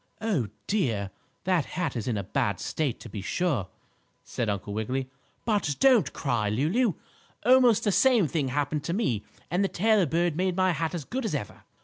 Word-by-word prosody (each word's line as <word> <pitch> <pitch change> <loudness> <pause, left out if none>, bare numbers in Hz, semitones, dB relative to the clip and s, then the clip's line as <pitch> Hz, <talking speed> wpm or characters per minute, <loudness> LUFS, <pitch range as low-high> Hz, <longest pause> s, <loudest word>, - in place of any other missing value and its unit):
"Oh, 195 - 0 0.2
dear! 110 - 0 0.3
That 180 -5 +2
hat 165 -8 -1
is 115 -1 -3
in 115 -4 0
a 100 - -2
bad 95 0 -1
state, 145 -7 -2
to - - -8
be 105 -2 -6
sure," 130 - -1 0.6
said 115 -3 -3
Uncle 100 0 -3
Wiggily. 130 +5 -2 0.3
"But 205 -10 +1
don't 260 -5 +5
cry, 120 -8 -1
Lulu. 170 - +1 0.5
Almost 250 -3 +5
the 205 - +2
same 235 -4 +4
thing 150 -2 -1
happened 145 +2 -1
to 170 - -1
me 125 - 0 0.3
and 180 +3 +2
the - - +2
tailor 210 -1 +2
bird 170 +2 +1
made 185 +1 0
my 185 0 +3
hat 165 0 -2
as 155 -5 -5
good 260 +2 -3
as 215 -9 -1
ever. 105 -9 -6
160 Hz, 190 wpm, -27 LUFS, 120-200 Hz, 0.6 s, don't